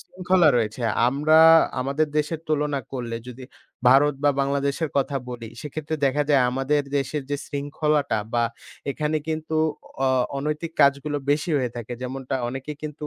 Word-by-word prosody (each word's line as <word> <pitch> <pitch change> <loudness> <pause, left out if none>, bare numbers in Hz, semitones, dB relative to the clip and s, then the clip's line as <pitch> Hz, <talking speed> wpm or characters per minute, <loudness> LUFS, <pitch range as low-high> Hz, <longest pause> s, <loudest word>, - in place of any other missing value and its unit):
শৃঙ্খলা 180 -2 +2
রয়েছে। 110 0 -1 0.3
আমরা 150 +4 +3 0.4
আমাদের 140 +4 0
দেশের 155 +1 -2
তুলনা 150 -2 0
করলে, 120 -3 -4
যদি 125 +1 -9 0.4
ভারত 140 +3 +5
বা 145 - +6
বাংলাদেশের 140 +2 -1
কথা 140 0 +1
বলি, 115 -2 -7
সেক্ষেত্রে 155 +1 -4
দেখা 145 +2 +1
যায় 140 -3 +5
আমাদের 135 +3 0 0.2
দেশের 140 +2 -2
যে 145 - 0
শৃঙ্খলাটা 145 -1 -1 0.2
বা 120 - +3 0.5
এখানে 150 +2 -1
কিন্তু 160 0 -2 0.5
অ - - +4 0.3
অনৈতিক 150 +3 -3
কাজগুলো 140 +1 +3
বেশি 150 +4 +1
হয়ে 125 -2 -1
থাকে, 120 0 -6
যেমনটা 130 +1 -4
অনেকে 135 +4 -5
কিন্তু 150 0 -6
145 Hz, 145 wpm, -24 LUFS, 135-150 Hz, 0.5 s, বা